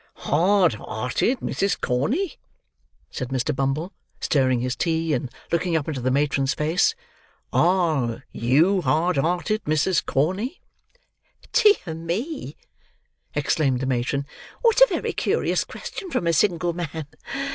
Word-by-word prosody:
"Hard 180 - +3
hearted, 125 - -1
Mrs. 195 +1 -1
Corney?" 240 - -1 0.7
said 125 - -4
Mr. 135 +2 -1
Bumble, 140 +7 -1 0.3
stirring 130 -4 +2
his 125 +1 -2
tea, 165 +1 0
and 130 -1 -1 0.2
looking 170 0 +1
up 150 - -3
into 145 -5 -3
the 130 - +1
matron's 140 0 +1
face; 165 - +2 0.6
"are 155 -10 +2
you 160 - +3
hard 160 +4 +1
hearted, 180 +8 0
Mrs. 155 +4 +2
Corney?" 190 - -1 0.9
"Dear 410 - +4
me!" 170 - -4 0.8
exclaimed 140 -2 +1
the 130 - -2
matron, 130 +2 -1 0.4
"what 465 0 +4
a - - +10
very - - -2
curious - - +1
question 390 -4 -8
from 180 - -1
a 170 - +2
single 175 -1 +2
man. 160 -3 -5
160 Hz, 125 wpm, -24 LUFS, 135-185 Hz, 0.9 s, a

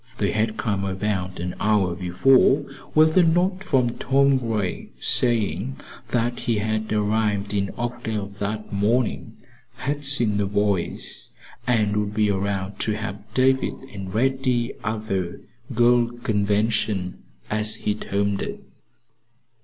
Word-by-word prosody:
They 100 - +1
had 110 0 0
come 100 -3 -1
about 95 -1 -2
an 90 +1 -3
hour 105 -4 +2
before 130 - +4 0.3
with 155 0 +5
a - - +8
note 180 +3 +2
from 125 -9 +1
Tom 135 0 +3
Gray 110 -6 -2
saying 120 +1 +1 0.3
that 120 +1 0
he 120 -2 0
had 110 +1 -1
arrived 105 -1 0
in 100 -1 0
Oakdale 115 -3 -3
that 105 +1 -3
morning, 110 +4 0 0.4
had 145 +2 -3
seen 120 -7 +2
the 100 -1 +1
boys 100 -3 -1 0.3
and 110 -4 +2
would 105 0 -1
be 105 -1 +3
around 100 0 -2
to 110 - 0
help 105 -1 -6
David 130 0 +3 0.2
and 95 -2 -6
Reddy 125 +1 +1
at 110 0 -3
the 95 -4 -2 0.3
"girl 120 0 +4 0.2
convention," 105 -2 0 0.3
as 105 0 +1
he 105 - -1
termed 100 -1 -1
it. - - -5
110 Hz, 130 wpm, -24 LUFS, 100-120 Hz, 0.4 s, a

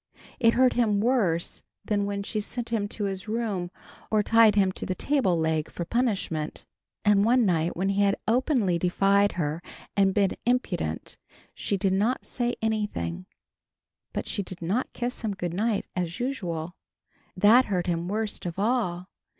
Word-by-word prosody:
It 230 -2 +4
hurt 255 0 +4
him 215 -4 +2
worse 205 -8 +1 0.2
than 205 -1 0
when 200 0 -3
she 215 +2 -2
sent 235 +3 -5
him 220 -3 0
to 210 - -5
his 195 +1 -3
room 210 -5 -2 0.4
or 215 -1 +2
tied 225 -1 +5
him 195 -2 +3
to - - -5
the 185 - -1
table 255 -12 +1
leg 160 -1 0
for 170 - -5
punishment. 195 -10 -1 0.4
And 205 -1 +5
one 240 +2 +4
night 170 -3 +1
when 190 +2 0
he 200 +1 +1
had 200 -1 +3
openly 230 - +2
defied 195 +3 +3
her 160 -1 -2 0.3
and 195 -1 +4
been 200 -2 +3
impudent, 185 - -1 0.4
she 200 - -2
did 190 0 +1
not 215 +7 +1
say 245 -1 -1
anything, 150 - -2 0.8
but - - -4
she - - -1
did 185 -2 -8
not 205 +10 -1
kiss 245 0 -4
him 215 -4 -2
good 175 -3 -3
night 210 +2 0
as 175 -2 -3
usual. 180 -10 -3 0.6
That 220 +7 +6
hurt 180 -4 -1
him 170 -1 -1
worst 210 -1 -3
of 170 - -5
all. 200 -5 0
200 Hz, 165 wpm, -26 LUFS, 180-230 Hz, 0.8 s, That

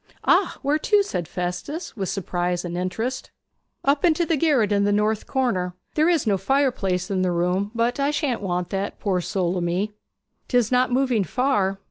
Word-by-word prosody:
'Ah, 365 +1 +3
where 290 +3 +2
to?' 415 +4 +3
said 180 - -4
Festus, 180 - -4
with 195 -4 -3
surprise 180 -2 -2
and 175 0 -4
interest. 220 +9 -3 0.6
'Up 280 +1 +2
into 340 -1 +3
the 325 - +1
garret 275 -9 +2
in 200 0 +3
the 205 - +2
north 210 +1 +1
corner. 190 -10 0 0.2
There 310 +2 +3
is 330 -6 +2
no 200 -3 +2
fireplace 195 -6 0
in 190 -1 +1
the 185 -1 +1
room; 180 +3 0
but 235 +4 0
I 280 +1 +2
shan't 290 -6 -1
want 180 -2 -2
that, 195 +1 -3
poor 185 -3 0
soul 180 0 -1
o' - - -1
me.' 180 +5 -1 0.6
''Tis 245 -3 +2
not 250 0 +3
moving 250 -4 +2
far.' 200 -5 0
210 Hz, 185 wpm, -23 LUFS, 180-270 Hz, 0.6 s, Ah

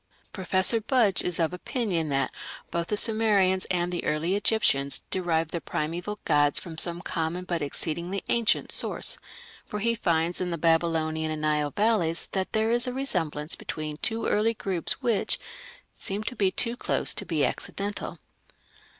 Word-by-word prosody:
Professor 190 +4 +1
Budge 230 -5 +4
is 180 -2 0
of 165 +1 +1
opinion 180 - -1
that 135 -1 0 0.4
"both 170 0 -1
the 210 - +1
Sumerians 205 -5 +3
and 175 -1 -1
the 175 - -2
early 160 +4 0
Egyptians 170 -10 +2
derived 165 -4 0
their 170 - -3
primeval 175 +7 -3
gods 145 -1 +3
from 170 -3 -4
some 170 +1 +1
common 170 0 -2
but 175 -2 -2
exceedingly 170 +6 -2
ancient 235 -2 +1
source", - - 0 0.4
for 210 - -6
he 230 +3 +1
finds 170 -5 0
in 180 - -1
the 170 - -2
Babylonian 160 -1 +1
and 155 -1 -3
Nile 150 -1 +1
valleys 185 -4 +1
that 190 -1 -2
there 220 +1 +2
is 240 +1 +3
a 250 - -2
resemblance 170 - 0
between 155 -1 -5
two 225 +7 +1
early 225 +2 +2
groups 195 +1 -2
which 235 -4 +1 0.6
"seems 205 +2 -2
to 250 - -3
be 195 -4 +2
too 235 +5 0
close - - 0
to - - -4
be 165 -6 +1
accidental". 205 +1 -3
180 Hz, 160 wpm, -27 LUFS, 160-210 Hz, 0.6 s, Budge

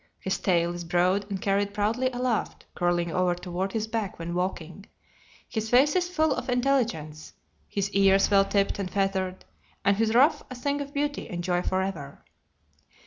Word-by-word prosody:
His 190 0 -2
tail 175 -2 +1
is 175 0 -6
broad 180 +4 +1
and 195 -2 -3
carried 200 +1 0
proudly 225 +5 +1
aloft, 245 -3 -2
curling 175 -1 0
over 180 +1 +1
toward 180 +2 -4
his 220 -1 -1
back 220 -3 -3
when 170 +1 -5
walking. 180 +1 -4 0.6
His 220 -1 -3
face 270 +7 +4
is 355 -1 +1
full 315 -4 +2
of - - -5
intelligence: 235 - -1 0.3
his 200 -1 -2
ears 195 0 +4
well 195 -1 +5
tipped 200 0 0
and 190 -2 -2
feathered, 190 -1 -1 0.4
and 200 0 +3
his 225 0 +1
ruff 275 +6 +5
a 255 - -7
thing 285 +3 -2
of 280 0 -6
beauty 290 0 -2
and 175 - -5
a - - -3
joy 175 0 +1
forever. 185 -7 -3
195 Hz, 175 wpm, -27 LUFS, 180-240 Hz, 0.6 s, well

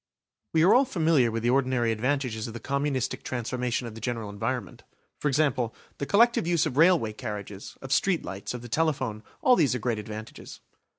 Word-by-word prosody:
We 160 -1 +4
are 185 - +6
all 260 +3 +5
familiar 160 - +2
with 115 0 -3
the 120 - +3
ordinary 130 -3 +2
advantages 120 -1 -1
of 115 - -8
the - - -5
communistic 135 0 -1
transformation 125 0 -2
of 115 - -7
the 115 - -10
general 115 -3 -3
environment. 110 +1 -4 0.4
For - - -1
example, 135 -5 +1 0.2
the 140 - -3
collective 230 -3 +4
use 170 -3 +2
of 145 -5 -3
railway 160 -8 +4
carriages, 105 -3 -7
of 135 +1 -1
street 185 0 +1
lights, 95 +6 -5
of 120 - -7
the - - -7
telephone, 130 -6 -1 0.2
all 255 - +6
these 145 - +2
are - - -2
great 115 -1 -1
advantages. 110 +1 -8
125 Hz, 190 wpm, -27 LUFS, 115-150 Hz, 0.4 s, are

